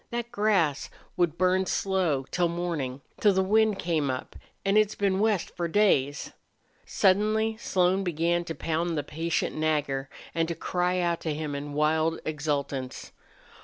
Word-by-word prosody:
That 235 0 -4
grass 200 - +1 0.3
would 170 -2 +1
burn 185 +1 +2
slow 180 -9 0
till 175 -1 +2
mornin' 165 -6 -3 0.2
till 205 -2 +4
the 190 0 +2
wind 215 +1 +3
came 160 -5 0
up 130 0 -4 0.3
an' 195 +1 +2
it's 215 -1 +3
been 195 -1 +1
west 210 -3 0
for 170 -1 -1
days." 150 -7 +2 0.6
Suddenly 215 +3 +2
Slone 185 -3 +1
began 170 0 0
to 165 - -5
pound 165 +1 -1
the 145 - -1
patient 165 +3 -2
Nagger 145 -3 -1 0.2
and 165 0 0
to 170 - -3
cry 180 +1 -1
out 170 -1 0
to 155 -2 -2
him 150 -1 -4
in 145 +1 -5
wild 160 +2 +1
exultance. 140 -4 -3
170 Hz, 155 wpm, -27 LUFS, 150-190 Hz, 0.6 s, till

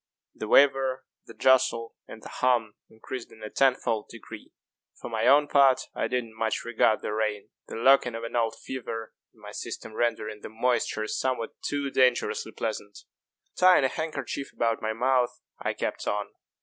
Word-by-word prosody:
The 110 - -6
waver, 135 0 +4 0.2
the - - -12
jostle, 125 -3 +3
and 110 - -11
the - - -8
hum 120 -4 +1 0.2
increased 115 +2 -8
in 110 - -14
a 105 - -6
tenfold 125 -5 +1
degree. 115 -1 -11 0.5
For - - -7
my 110 +1 0
own 145 +2 +6
part 135 -2 +5
I - - -1
did 125 -1 -1
not 110 -1 -15
much 110 -1 -1
regard 115 -2 +2
the - - -2
rain 105 -1 -2 0.2
the - - -7
lurking 125 0 +4
of 115 - -6
an 115 - -5
old 115 -2 +1
fever 115 -4 -6 0.2
in - - -27
my - - -10
system 110 - -7
rendering 110 -2 -2
the - - -8
moisture 115 -1 0
somewhat 125 0 -2
too 140 -1 -2
dangerously 125 -2 +2
pleasant. 105 -2 -5 0.6
Tying 180 -5 +6
a 130 - +3
handkerchief 140 -3 -4
about 115 -1 0
my 110 0 -1
mouth, 125 +1 +1 0.2
I - - -2
kept - - -4
on. 105 0 -1
120 Hz, 175 wpm, -27 LUFS, 110-130 Hz, 0.6 s, own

